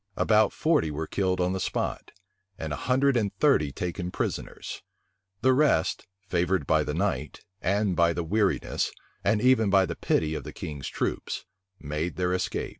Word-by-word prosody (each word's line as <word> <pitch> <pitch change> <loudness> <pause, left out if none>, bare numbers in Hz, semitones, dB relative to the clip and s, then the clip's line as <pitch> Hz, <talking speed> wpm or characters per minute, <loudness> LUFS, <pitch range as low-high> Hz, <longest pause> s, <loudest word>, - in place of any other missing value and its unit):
About 110 -1 +4
forty 155 - +2
were 75 +2 -3
killed 95 +1 0
on 90 +1 +1
the 95 - -2
spot, - - -2 0.5
and 80 -2 -4
a 75 - -6
hundred 135 +1 +4
and 105 -4 +1
thirty 135 - +3
taken 90 +3 -4
prisoners. - - -4 0.6
The 130 +1 +5
rest, 135 - +2 0.2
favored 90 -3 +1
by 80 +1 +3
the 75 - -3
night, 90 -7 -2 0.2
and 100 +1 +1
by 85 -1 +3
the 85 - -2
weariness, 100 +3 0 0.3
and 105 +2 +3
even 125 -4 +4
by 95 -1 +5
the - - -4
pity 80 0 0
of - - -4
the - - -8
king's 70 -3 -6
troops, - - -3 0.3
made 75 +4 -3
their 90 0 0
escape. 90 - -2
90 Hz, 170 wpm, -27 LUFS, 80-105 Hz, 0.6 s, The